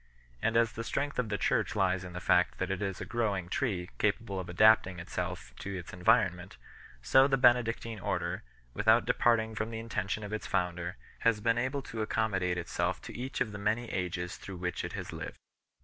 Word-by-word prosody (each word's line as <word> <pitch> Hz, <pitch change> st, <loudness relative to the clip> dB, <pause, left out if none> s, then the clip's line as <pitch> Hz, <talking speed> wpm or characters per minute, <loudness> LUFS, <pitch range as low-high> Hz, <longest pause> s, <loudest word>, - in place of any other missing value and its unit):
And 115 Hz, +1 st, +2 dB
as 115 Hz, -1 st, +4 dB
the 115 Hz, -, -5 dB
strength 140 Hz, +5 st, -2 dB
of 120 Hz, -4 st, 0 dB
the 105 Hz, -, 0 dB
Church -, -, +1 dB
lies 95 Hz, -2 st, +2 dB
in 90 Hz, -1 st, -8 dB
the 90 Hz, -, -4 dB
fact -, -, +3 dB
that 95 Hz, +1 st, -2 dB
it 95 Hz, -, -2 dB
is 95 Hz, -2 st, -2 dB
a -, -, -4 dB
growing 100 Hz, -7 st, -1 dB
tree, 95 Hz, -8 st, -1 dB
capable 105 Hz, -1 st, 0 dB
of 90 Hz, -1 st, -6 dB
adapting 110 Hz, 0 st, +5 dB
itself 85 Hz, -, -5 dB
to 100 Hz, -1 st, -4 dB
its 90 Hz, -, -8 dB
environment, 90 Hz, -2 st, +2 dB, 0.5 s
so 135 Hz, +1 st, +6 dB
the 135 Hz, -1 st, +2 dB
Benedictine 115 Hz, -3 st, +3 dB
Order, -, -, -2 dB, 0.3 s
without 110 Hz, +3 st, +4 dB
departing 110 Hz, -2 st, +2 dB
from 110 Hz, +1 st, -2 dB
the 115 Hz, -, -5 dB
intention 110 Hz, -2 st, -3 dB
of 105 Hz, +1 st, -6 dB
its 110 Hz, -, -3 dB
founder, 90 Hz, 0 st, -1 dB, 0.2 s
has 115 Hz, -2 st, +3 dB
been 115 Hz, +2 st, +2 dB
able 130 Hz, +3 st, -1 dB
to 115 Hz, -2 st, -5 dB
accommodate 100 Hz, -5 st, 0 dB
itself 85 Hz, -1 st, -1 dB
to -, -, -8 dB
each 130 Hz, +2 st, -4 dB
of 110 Hz, -, +1 dB
the 105 Hz, -, -7 dB
many 110 Hz, +4 st, 0 dB
ages 90 Hz, -1 st, -3 dB
through 95 Hz, -2 st, -8 dB
which 90 Hz, 0 st, -3 dB
it -, -, -5 dB
has -, -, -5 dB
lived. -, -, -6 dB
105 Hz, 200 wpm, -31 LUFS, 90-115 Hz, 0.5 s, so